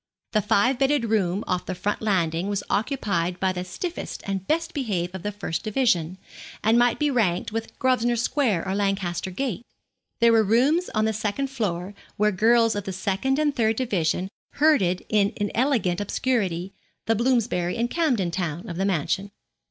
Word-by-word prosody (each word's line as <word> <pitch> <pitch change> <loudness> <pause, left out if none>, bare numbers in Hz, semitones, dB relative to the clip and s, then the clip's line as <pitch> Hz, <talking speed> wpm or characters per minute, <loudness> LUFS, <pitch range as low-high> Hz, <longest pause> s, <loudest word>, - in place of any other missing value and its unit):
The 215 - +2
five 240 +5 +2
bedded 270 -2 +2
room 200 -1 +1
off 180 -1 -2
the 185 - -3
front 205 +3 -2
landing 180 -4 0
was 200 -1 -1
occupied 200 - -1
by 190 0 +1
the 180 0 -4
stiffest 340 - -5
and 195 -1 -3
best 330 +3 0
behaved 190 - -2
of 190 - -6
the 205 - -3
first 195 -5 -4
division, 200 -7 +1 0.5
and 225 +2 +4
might 245 0 +3
be 295 -1 +1
ranked 195 -9 +1
with 225 +1 -5
Grosvenor 245 -2 +2
Square 230 - 0
or 190 - -1
Lancaster 195 -3 -1
Gate. 230 +2 -3 0.6
There 235 0 +5
were 225 -1 +5
rooms 265 - +2
on 215 0 +2
the 220 - +1
second 215 +6 -2
floor 195 -6 -3 0.2
where 210 +1 +3
girls 230 +3 +4
of 205 -1 -3
the 190 - -4
second 195 +8 0
and 295 -1 +1
third 225 -1 +2
division 190 -7 0 0.3
herded 275 - +2
in 210 0 +2
inelegant 205 -3 0
obscurity, 195 -5 -1 0.3
the 225 - +3
Bloomsbury 225 -7 +1
and 235 +1 +1
Camden 245 - 0
Town 175 -2 -3
of 170 - -6
the 195 - 0
mansion. 195 +2 0
210 Hz, 175 wpm, -24 LUFS, 185-240 Hz, 0.6 s, There